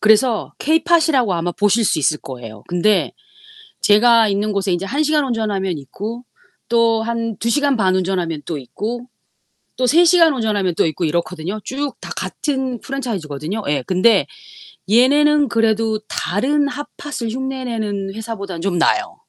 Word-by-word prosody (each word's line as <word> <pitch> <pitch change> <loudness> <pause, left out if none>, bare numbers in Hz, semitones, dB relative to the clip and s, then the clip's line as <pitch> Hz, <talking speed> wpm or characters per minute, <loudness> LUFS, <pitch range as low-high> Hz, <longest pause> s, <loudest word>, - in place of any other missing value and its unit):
그래서 220 +2 +3
케이팟이라고 315 - +2
아마 175 +1 -2
보실 210 +4 +2
수 185 - +2
있을 150 +1 +1
거예요. 115 -6 -9
근데 180 +3 +1 0.7
제가 225 +1 +5
있는 205 +1 0
곳에 200 -2 -1
인제 175 +3 -2
1 285 +8 0
시간 305 0 +2
운전하면 205 - -1
있고 210 - -7 0.5
또 230 -1 +3
한 230 -1 -3
2 230 - -1
시간 280 0 +2
반 185 -3 +2
운전하면 180 -4 -1
또 165 - -3
있고 225 - -5 0.7
또 255 - +1
3 335 +6 +5
시간 335 -2 +5
운전하면 210 -8 -1
또 - - +2
있고 160 +2 -2
이렇거든요. 170 +4 -2
쭉 280 +1 -4
다 - - -9
같은 265 -5 -3
프랜차이즈거든요. 200 - -4
예. 145 -3 0
근데 190 +5 +3 0.7
얘네는 290 +5 +4
그래도 225 -1 +1
다른 285 +9 0
핫팟을 290 -4 -6
흉내내는 230 -6 -3
회사보다는 200 -5 -6
좀 180 0 -1
나아요. 370 - +1
220 Hz, 320 characters per minute, -19 LUFS, 185-260 Hz, 0.7 s, 제가